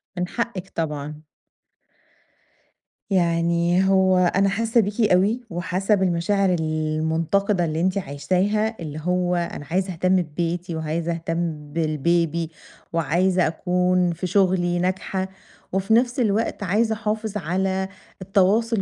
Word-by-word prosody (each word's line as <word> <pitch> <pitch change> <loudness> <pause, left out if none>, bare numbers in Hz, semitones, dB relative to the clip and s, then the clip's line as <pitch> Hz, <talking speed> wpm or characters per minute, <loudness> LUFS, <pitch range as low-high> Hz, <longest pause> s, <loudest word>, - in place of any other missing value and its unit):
من 180 0 -2
حقِك 200 -5 -4
طبعًا. 150 -1 -4 1.9
يعني 170 0 +2
هو 190 -1 +4
أنا 195 +2 +3
حاسّة 230 +3 +2
بيكِ 210 +3 -2
أوي، 200 +7 +3
وحاسّة 185 +4 0
بالمشاعر 190 +1 +1
المُنتقِدة 160 +4 0
اللي 160 +1 -2
أنتِ 185 +2 +1
عايشاها، 190 +8 0
اللي 155 -2 -6
هو 180 0 +1
أنا 170 -4 -3
عايزة 185 0 0
أهتم 185 +3 +2
ببيتي، 170 +2 -3
وعايزة 160 +2 -2
أهتم 165 -3 -3
بالbaby، 165 +1 0 0.4
وعايزة 175 +3 +2
أكون 180 +1 +1
في 175 +2 -4
شغلي 180 -2 +2
ناجحة، 190 +1 -2 0.4
وفي 195 +3 +1
نفْس 245 +2 +2
الوقت 220 -1 0
عايزة 220 +4 +1
أحافظ 215 -1 -2
على 190 +2 -1 0.3
التواصل 200 +3 +2
180 Hz, 115 wpm, -23 LUFS, 165-195 Hz, 1.9 s, هو